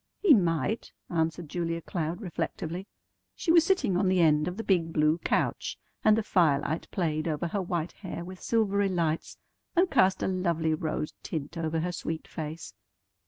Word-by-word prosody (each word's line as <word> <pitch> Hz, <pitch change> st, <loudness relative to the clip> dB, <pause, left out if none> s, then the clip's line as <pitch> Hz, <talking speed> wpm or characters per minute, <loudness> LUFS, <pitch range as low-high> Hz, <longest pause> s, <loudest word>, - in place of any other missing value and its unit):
"He 385 Hz, -7 st, +6 dB
might," 175 Hz, -, +1 dB, 0.2 s
answered 165 Hz, 0 st, -1 dB
Julia 165 Hz, +1 st, -2 dB
Cloud 170 Hz, +3 st, -3 dB
reflectively. 180 Hz, -1 st, -4 dB, 0.5 s
She 330 Hz, -, 0 dB
was 335 Hz, -1 st, +7 dB
sitting 280 Hz, -, +2 dB
on 190 Hz, +2 st, +2 dB
the 185 Hz, 0 st, +3 dB
end 155 Hz, -2 st, +4 dB
of 180 Hz, +2 st, -4 dB
the 225 Hz, -, -3 dB
big 170 Hz, -5 st, +2 dB
blue 155 Hz, +1 st, +2 dB
couch, -, -, -1 dB, 0.3 s
and 215 Hz, 0 st, +5 dB
the 225 Hz, -, +1 dB
firelight 160 Hz, -4 st, +2 dB
played 155 Hz, -3 st, -1 dB
over 160 Hz, +2 st, -1 dB
her 200 Hz, +3 st, -1 dB
white 175 Hz, -2 st, -2 dB
hair 175 Hz, -3 st, -7 dB
with 185 Hz, 0 st, -9 dB
silvery 200 Hz, -3 st, +2 dB
lights, 165 Hz, -3 st, -1 dB, 0.4 s
and 355 Hz, 0 st, +3 dB
cast 190 Hz, 0 st, +3 dB
a -, -, +1 dB
lovely 170 Hz, -4 st, 0 dB
rose 155 Hz, -1 st, -2 dB
tint 155 Hz, 0 st, -5 dB
over 160 Hz, -1 st, -1 dB
her 180 Hz, +2 st, -1 dB
sweet 160 Hz, -2 st, -4 dB
face. 155 Hz, -, -6 dB
170 Hz, 170 wpm, -28 LUFS, 160-190 Hz, 0.5 s, was